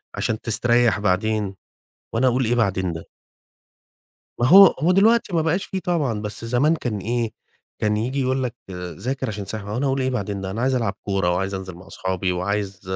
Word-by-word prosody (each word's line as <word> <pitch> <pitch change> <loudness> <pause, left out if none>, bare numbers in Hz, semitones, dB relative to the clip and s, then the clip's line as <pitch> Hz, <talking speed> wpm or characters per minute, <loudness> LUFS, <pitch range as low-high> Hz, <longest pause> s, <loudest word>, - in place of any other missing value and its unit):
عشان 110 -1 -2
تستريح 120 -1 +2
بعدين." 100 0 0 0.6
وأنا 125 +3 +2
أقول: 125 0 +2
"إيه 120 +2 +1
بعدين 95 -6 0
ده؟" 80 - -8 1.3
ما 120 - +3
هو 195 +3 +10
هو 165 +1 +2
دلوقتي 210 +1 +3
ما 165 - +3
بقاش 165 +5 0
في 190 - -4
طبعًا، 145 - -1
بس 105 +2 -6
زمان 130 +7 +2
كان 120 -9 -3
إيه؟ 115 +2 -1 0.5
كان 105 0 +1
ييجي 130 +5 -1
يقول 130 0 0
لك: 120 -1 -3 0.2
"ذاكر 95 - -4
عشان 100 -2 -4
تستريح." 100 +1 -5
وأنا 120 +7 -2
أقول: 135 0 0
"إيه 130 - +1
بعدين 100 -5 -3
ده؟ 95 0 -4
أنا 110 - -3
عايز 130 +1 +2
ألعب 115 -6 0
كورة 95 -3 0
وعايز 95 +2 -2
أنزل 95 -2 -6
مع 90 +2 -14
أصحابي 95 0 -2
وعايز 100 +2 -2
110 Hz, 190 wpm, -22 LUFS, 95-130 Hz, 1.3 s, هو